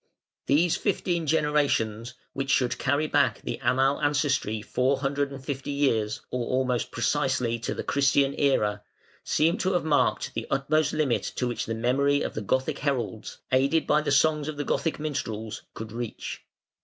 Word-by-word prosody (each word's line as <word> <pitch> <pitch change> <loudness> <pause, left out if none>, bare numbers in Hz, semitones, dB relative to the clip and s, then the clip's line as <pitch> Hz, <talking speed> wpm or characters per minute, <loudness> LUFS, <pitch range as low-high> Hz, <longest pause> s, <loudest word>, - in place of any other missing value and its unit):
] - - -67
These 160 +4 +3
fifteen 175 -4 -1
generations, 135 -7 +1 0.2
which 135 0 -3
should 125 -2 +2
carry 145 +2 +1
back - - +2
the - - -4
Amal 135 +3 +2
ancestry 145 -7 +1
four 130 +5 0
hundred 140 0 -1
and 135 -1 -9
fifty 135 0 -4
years, 115 -7 0
or 125 -1 -1
almost 130 -1 0
precisely 125 -2 0
to 115 - -3
the - - -4
Christian 140 0 +2
Era, 105 -8 +1 0.4
seem 165 +5 +2
to 190 +1 +1
have 175 - 0
marked 150 -2 +1
the - - -4
utmost 150 +3 +1
limit 150 -6 +1
to 125 - -1
which 120 - -3
the 115 - -2
memory 140 +5 +2
of - - -3
the 110 - -4
Gothic 130 +6 -1
heralds, 125 -7 -2
aided 135 +5 +3
by 150 +1 +3
the 150 - -2
songs 150 +1 +3
of 155 -1 -4
the 145 - -3
Gothic 160 - 0
minstrels, 115 -8 -4
could 110 0 -7
reach. 120 0 -5
135 Hz, 170 wpm, -26 LUFS, 120-150 Hz, 0.4 s, These